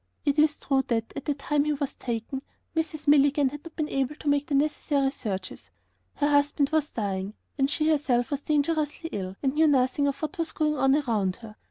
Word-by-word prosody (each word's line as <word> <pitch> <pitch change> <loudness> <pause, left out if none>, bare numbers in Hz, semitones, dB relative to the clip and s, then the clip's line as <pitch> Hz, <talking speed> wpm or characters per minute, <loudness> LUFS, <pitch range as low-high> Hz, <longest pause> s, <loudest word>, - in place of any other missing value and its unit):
It 285 +1 +2
is 305 -1 +4
true 270 -1 +1
that, 225 -2 -1
at - - -6
the 290 - 0
time 290 +1 0
he 300 - +1
was 285 -1 -3
taken, 240 +3 -4 0.3
Mrs. 315 -2 -2
Milligan 285 -1 +5
had 295 +2 -9
not 335 - -11
been 310 -2 -1
able 270 +1 -1
to 305 - -9
make 285 0 +2
the 290 - 0
necessary 285 -1 +1
searches. 195 -8 -5 0.5
Her 290 - +1
husband 285 0 +2
was 310 -1 +1
dying, 200 -1 -3 0.2
and 270 0 +3
she 310 +1 0
herself 280 -6 +2
was 285 -1 -1
dangerously 305 +2 0
ill 190 -1 -4
and 265 -1 +1
knew 315 +1 +4
nothing 275 0 +2
of 280 - -2
what 340 +4 -4
was 330 -1 -2
going 305 -1 +1
on 270 0 +3
around 220 -10 0
her. 225 -2 -12
285 Hz, 210 wpm, -27 LUFS, 260-300 Hz, 0.5 s, Milligan